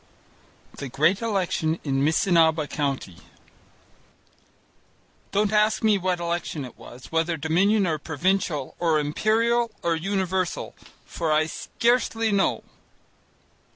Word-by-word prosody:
The 140 - -5
Great 160 - +2
Election 180 -7 -1
in 135 -2 0
Missinaba 160 -1 +3
County 135 - -3 2.1
Don't 210 +1 +1
ask 215 +1 +2
me 215 -2 +4
what 180 -1 -1
election 170 -4 -3
it 125 - -11
was, 125 +2 -13
whether 165 +1 0
Dominion 190 +7 +2
or 160 -3 -1
Provincial 160 -2 -1
or 165 -3 +2
Imperial 225 +10 +1
or 170 -1 +1
Universal, 190 +1 -2 0.3
for 165 -2 -3
I 155 +1 +3
scarcely 230 +5 0
know. 200 -1 +1
170 Hz, 110 wpm, -24 LUFS, 155-200 Hz, 2.1 s, me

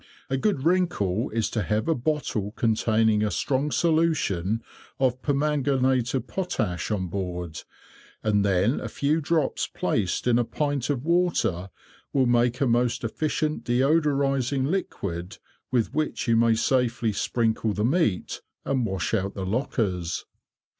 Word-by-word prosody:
A - - +2
good 140 -2 0
wrinkle 160 - +1
is 110 -2 0
to 110 - -1
have 105 - -1
a 165 - +3
bottle 120 -7 -2
containing 110 -2 +2
a 105 - +1
strong 135 +6 0
solution 150 - +1 0.4
of 130 -1 +1
permanganate 135 -4 +1
of 130 - -1
potash 110 - -2
on 100 -4 -1
board, 90 -3 -4 0.6
and 105 -2 +2
then 100 +6 +2
a - - -5
few 150 +3 0
drops 155 -1 0
placed 95 -5 -1
in 120 -1 +3
a - - +3
pint 145 +1 -2
of 140 -2 -1
water 155 - +1 0.4
will 135 -2 +3
make 120 +1 +2
a - - +4
most 120 0 +1
efficient 155 +5 -1
deodorising 135 0 +2
liquid, 95 - -3 0.3
with 125 -1 0
which 155 -3 -1
you 115 - +4
may 115 0 +4
safely 120 -2 +1
sprinkle 110 +1 0
the 105 +2 0
meat, 130 - 0 0.2
and 130 -4 0
wash 95 -3 -2
out 95 +1 0
the 95 - -3
lockers. 95 - -1
120 Hz, 140 wpm, -25 LUFS, 105-145 Hz, 0.6 s, a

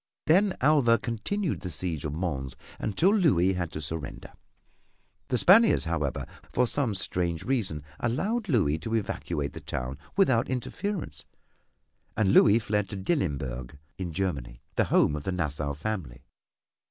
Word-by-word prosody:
Then 190 +5 +3
Alva 135 -5 +5
continued 140 - -2
the 90 - -5
siege 85 -2 -2
of 75 - -3
Mons 70 -7 -3 0.2
until 165 - +2
Louis 95 - +3
had 90 -3 -3
to 75 - -5
surrender. 75 -1 -6 0.9
The 125 - 0
Spaniards, 215 - +6
however, 80 -4 -2 0.3
for 125 - +2
some 120 -4 +2
strange 85 -3 0
reason 105 - -1 0.2
allowed 200 - -1
Louis 85 - +2
to 115 +7 -3
evacuate 75 -9 -2
the - - -8
town 65 +3 -5 0.2
without 130 -12 +3
interference 145 - -4 0.9
and 100 -3 +3
Louis 105 +1 +7
fled 105 -3 -1
to - - -5
Dillenburg 70 - -2 0.2
in 90 -3 -3
Germany, 70 -10 -3 0.2
the - - +3
home 75 - +3
of 75 - -5
the 95 - -2
Nassau 75 -5 -2
family. 75 - -5
95 Hz, 140 wpm, -27 LUFS, 75-125 Hz, 0.9 s, Louis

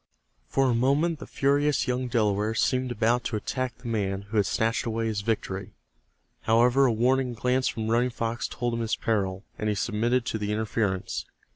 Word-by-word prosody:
For 135 -1 +2
a 125 - +2
moment 140 +7 +2
the - - -8
furious 145 +1 +1
young 125 0 -1
Delaware 110 -2 +1
seemed 130 +2 +1
about 120 +1 +1
to 115 - -2
attack 130 +4 -3
the 125 - -10
man 100 -3 -1
who 105 +2 -4
had 100 - +3
snatched 115 +1 0
away 115 0 -1
his 110 -2 -1
victory. 100 -3 -3 0.7
However, 120 +4 +4
a - - +3
warning 125 +2 +1
glance 125 +3 +1
from 110 -1 -2
Running 120 +3 +2
Fox 115 -1 -3
told 120 -1 -3
him 115 - -2
his 115 -1 0
peril, 100 -4 -1 0.2
and 110 - 0
he 105 - 0
submitted 115 +4 0
to 110 - -2
the 105 0 -2
interference. 105 -3 -1
115 Hz, 185 wpm, -27 LUFS, 110-125 Hz, 0.7 s, However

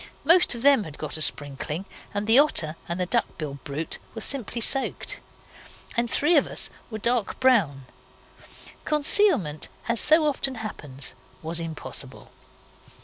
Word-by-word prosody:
Most 340 -1 +4
of 235 - -7
them 280 -5 +4
had 155 -4 -10
got 155 -2 -5
a 155 - -4
sprinkling, 145 +4 -1 0.3
and 205 +1 -3
the 225 +5 +7
otter 165 - +2
and 170 +1 -3
the 180 - 0
duck 235 +6 -1
bill 140 -3 -6
brute 150 +3 -5 0.2
were 225 - -6
simply 240 -2 -2
soaked. 270 +4 0 0.8
And 235 -1 0
three 315 +8 +2
of 285 - +2
us - - 0 0.2
were 220 - -6
dark 235 -1 -1
brown. 190 - +2 1.0
Concealment, 295 - +2 0.2
as 235 -1 +3
so 315 +1 +6
often 270 -2 -1
happens, 145 - -6 0.3
was 165 +1 0
impossible. 165 -1 -4
220 Hz, 145 wpm, -24 LUFS, -, 1.0 s, the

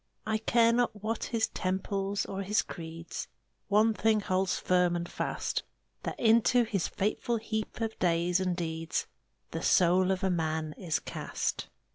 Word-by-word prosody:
I 220 0 0
care 230 +1 +4
not 230 -4 0
what 225 +1 -1
his 225 -2 0
temples 195 +1 -1
or 195 0 -4
his 205 +2 +1
creeds, 165 0 -7 0.4
One 215 +2 +4
thing 220 0 +2
holds 190 -2 0
firm 180 -1 +2
and 170 0 -2
fast - - -2 0.4
That - - -5
into 230 +2 +5
his 205 -6 -1
fateful 215 +4 -1
heap 220 0 -4
of 225 -1 -2
days 175 +1 +2
and 180 -2 0
deeds 160 -2 -2 0.5
The - - -3
soul 180 +1 +4
of 190 +1 0
a 190 - +2
man 160 -2 -1
is 170 -5 -1
cast. - - -3
195 Hz, 155 wpm, -30 LUFS, 175-220 Hz, 0.5 s, into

